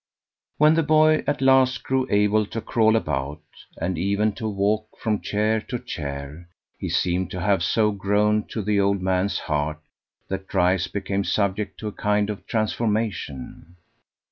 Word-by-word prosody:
When 150 +1 +6
the 165 - +3
boy 155 0 +4
at 145 -2 0
last 130 -1 +4
grew 130 0 0
able 105 +1 +2
to 115 - -4
crawl 110 0 +2
about, 75 -5 -2 0.3
and 85 0 -2
even 100 +4 +1
to 110 +2 -4
walk 105 +2 0
from 110 -3 -1
chair 110 +1 0
to 125 - -1
chair, 70 -2 -7 0.3
he - - -3
seemed 90 +1 0
to 90 - -5
have 100 -1 +2
so 105 +4 +2
grown 105 +1 +1
to 110 - -4
the 105 0 +1
old 100 0 +2
man's 95 +1 +1
heart 75 +1 -2 0.5
that 95 0 -5
Dryce 90 0 +2
became 100 0 -2
subject 100 0 -1
to 110 - -4
a - - -3
kind 105 0 0
of 105 - -9
transformation. 105 - -2
105 Hz, 160 wpm, -24 LUFS, 95-110 Hz, 0.5 s, When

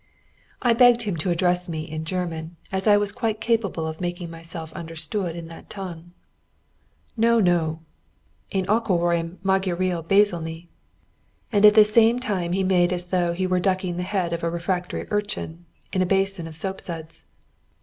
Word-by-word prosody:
I 240 -2 +5
begged 240 0 +5
him 205 -5 -2
to 170 +4 -2
address 180 +1 +1
me 160 -2 -3
in 155 0 -6
German, 170 -2 -4 0.2
as 190 +2 -2
I 205 -1 +7
was 205 0 0
quite 220 -2 -2
capable 220 -8 0
of 160 +1 -5
making 175 -1 -4
myself 165 -1 -7
understood 165 +2 -4
in 170 -1 -7
that 165 - -12
tongue. 175 -3 -8 1.0
"No! 230 0 +4
no! 165 -4 +1 0.7
En 190 -1 0
akarom 175 -5 +1
magyariul 185 -3 0
beszélni" 170 -3 +1 0.9
and 210 -1 +7
at 210 - +6
the 215 -1 +8
same 225 +2 +5
time 190 -9 -2
he 190 +1 +1
made 180 -2 +3
as 180 -1 -2
though 175 -2 +1
he 185 +2 -1
were 185 0 +1
ducking 185 -1 0
the - - -1
head 180 -2 -1
of 170 - -3
a 170 - +1
refractory 175 +1 -2
urchin 205 -5 -3 0.3
in 185 - +1
a - - +3
basin 195 -2 0
of 160 - -10
soapsuds. 165 -2 -6
180 Hz, 165 wpm, -24 LUFS, 170-200 Hz, 1.0 s, the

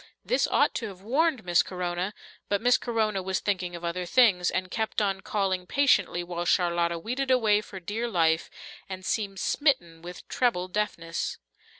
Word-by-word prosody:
This - - +2
ought - - +3
to 225 - -3
have 190 -2 -11
warned 275 - +1
Miss 175 -1 +4
Corona, 180 +2 -3 0.3
but 200 - +2
Miss 245 +3 +4
Corona 220 -4 0
was 190 0 -1
thinking 180 -3 -2
of 170 - -9
other 175 +1 -3
things, 190 -5 +4
and 185 0 -2
kept 220 -1 -1
on 195 -2 0
calling 190 -3 -1
patiently, 275 -10 +2
while 175 0 -4
Charlotta 170 -1 +1
weeded 250 +10 -3
away 220 -5 +4
for 195 -2 -9
dear 210 +6 -3
life, 165 -6 +1 0.4
and 185 -1 -7
seemed 195 -2 -2
smitten 175 - +1
with 175 +1 -10
treble 185 -8 0
deafness. 170 -4 -2
190 Hz, 170 wpm, -27 LUFS, 175-225 Hz, 0.4 s, Miss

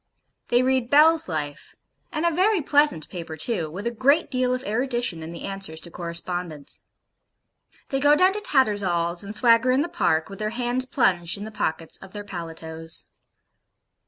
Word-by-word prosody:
They 245 +1 +3
read 260 -2 +1
BELL'S 310 - +5
LIFE 150 -3 -5 0.4
(and 310 +2 -2
a 340 - +3
very 380 +5 +2
pleasant 290 - +2
paper 165 -3 -7
too, 165 -1 +2
with 190 +7 -7
a 235 - 0
great 275 +7 +2
deal 255 -1 +1
of 255 0 -2
erudition 240 -5 -1
in 160 +1 -7
the 170 - -8
answers 195 -5 -3
to 170 - -6
correspondents). 170 -3 -4 1.1
They 270 - 0
go 290 +2 +5
down 370 +5 +4
to 420 - -3
Tattersall's, 195 - +1
and 200 +2 -3
swagger 230 +1 +4
in 260 +2 +3
the 315 - -1
Park, 160 - 0
with 195 - -10
their 215 0 -1
hands 245 +2 -1
plunged 180 -10 +1
in 200 - -7
the 220 - -7
pockets 165 -5 -2
of 190 -1 -13
their 205 -1 -6
paletots. 165 -3 -6
215 Hz, 175 wpm, -24 LUFS, 170-260 Hz, 1.1 s, BELL'S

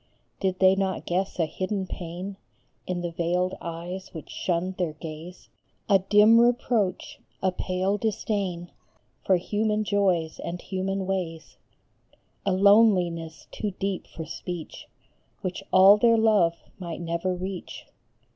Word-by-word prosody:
Did 190 -1 0
they 190 0 +6
not 190 -1 -2
guess 185 +2 -1
a 165 - +2
hidden 190 +4 -3
pain 180 +2 -6 0.5
In 180 -1 -2
the 175 -1 -3
veiled 175 +2 0
eyes 175 +3 -6
which 160 - -8
shunned 180 +1 -2
their 175 -4 -1
gaze; 160 +3 -9 0.4
A 195 -2 +5
dim 210 +4 +6
reproach, 235 -5 0 0.2
a 190 - +3
pale 185 +2 -1
disdain 195 -5 -2 0.5
For 190 - +4
human 210 +3 0
joys 190 -6 +1
and 175 +1 -5
human 190 +1 -3
ways; 180 -4 -4 0.9
A - - +3
loneliness 185 -5 +3
too 205 -3 -4
deep 195 -1 -3
for 160 - -8
speech, 170 +1 -7 0.5
Which 185 -1 -4
all 190 +2 +8
their 230 +1 +4
love 210 -7 +4 0.2
might 170 -2 -5
never 170 +2 -2
reach 185 0 -6
185 Hz, 130 wpm, -26 LUFS, 175-200 Hz, 0.9 s, all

